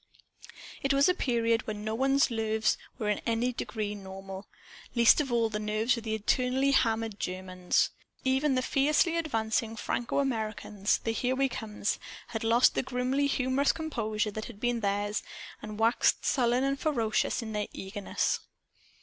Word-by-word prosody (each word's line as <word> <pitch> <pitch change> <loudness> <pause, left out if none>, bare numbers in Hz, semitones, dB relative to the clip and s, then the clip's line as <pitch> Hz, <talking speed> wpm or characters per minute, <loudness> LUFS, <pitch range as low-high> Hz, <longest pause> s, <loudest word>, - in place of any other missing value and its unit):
It 275 -2 +2
was 275 +1 +5
a 365 - +4
period 230 -7 +1
when 210 -1 -4
no 215 0 -2
one's 270 +2 +3
nerves 220 -1 +1 0.2
were 215 - -3
in 210 - +1
any 235 +2 0
degree 215 -3 -3
normal 195 0 -8 0.5
least 235 +5 +6
of 270 -4 -4
all 230 -1 +3
the 210 -1 -3
nerves 215 +3 +1
of 230 - -6
the 220 -1 -1
eternally 255 +5 +1
hammered 225 -5 +1
Germans. 185 0 0 0.3
Even 265 +1 +2
the 255 - +1
fiercely 300 +6 +2
advancing 225 -8 -1
Franco 235 +1 -2
Americans, 215 -6 0
the 225 - 0
"Here 250 +3 0
We 270 0 +2
Comes," 210 -3 -3 0.3
had 225 -1 -4
lost 230 +2 +5
the - - +1
grimly 260 +2 0
humorous 270 0 +2
composure 220 -9 -2
that 215 +1 -5
had 220 -4 -10
been 240 0 0
theirs, 205 0 -1 0.4
and 215 -1 -7
waxed 225 +2 +2
sullen 245 -1 +2
and 275 0 0
ferocious 235 -6 0
in 220 - -6
their 210 -1 -2
eagerness. 195 +1 -2
230 Hz, 160 wpm, -29 LUFS, 215-260 Hz, 0.5 s, least